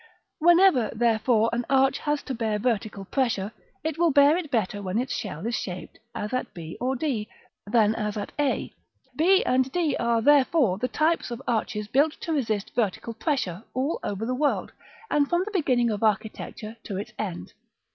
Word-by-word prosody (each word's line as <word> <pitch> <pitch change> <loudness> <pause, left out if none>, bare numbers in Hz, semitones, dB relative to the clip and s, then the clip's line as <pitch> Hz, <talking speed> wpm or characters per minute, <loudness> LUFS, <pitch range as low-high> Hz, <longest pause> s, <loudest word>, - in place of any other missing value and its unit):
§ - - -25 0.4
VII. 315 - -4
Whenever, 345 - +6
therefore, 225 0 +2
an 240 +1 0
arch 270 0 +3
has 295 -1 -1
to 270 - -4
bear 225 -3 -1
vertical 210 -3 -2
pressure, 225 -4 -1 0.3
it 315 0 -3
will 340 -1 +4
bear 285 +1 +6
it 345 -4 -3
better 210 -4 -1
when 190 +1 -2
its 250 +2 -1
shell 185 -3 -5
is 235 - -1
shaped 185 -5 -5 0.2
as 210 +4 -4
at 255 - -2
b 165 -1 -7
or 260 +2 0
d, 240 -7 -2 0.4
than 215 -1 +3
as 210 -2 -3
at 205 - -4
a: 290 -2 0 0.4
b 370 +6 +4
and 260 +1 +2
d 325 -4 +1
are, 235 -1 +2
therefore, 275 - +4
the 250 - 0
types 315 +3 +1
of 240 -1 -5
arches 210 -2 -1
built 285 +7 +3
to 330 - -4
resist 220 -8 -1
vertical 230 +1 -1
pressure, 225 - -2
all 270 +5 -1
over 205 +2 -3
the 250 - -1
world, 290 +3 0 0.4
and 285 -1 +2
from 345 +1 +2
the 430 - -6
beginning 250 - +2
of 210 - -3
architecture 215 +1 -2
to 195 - -5
its 200 - -6
end. 175 - -5
240 Hz, 190 wpm, -26 LUFS, 210-285 Hz, 0.4 s, Whenever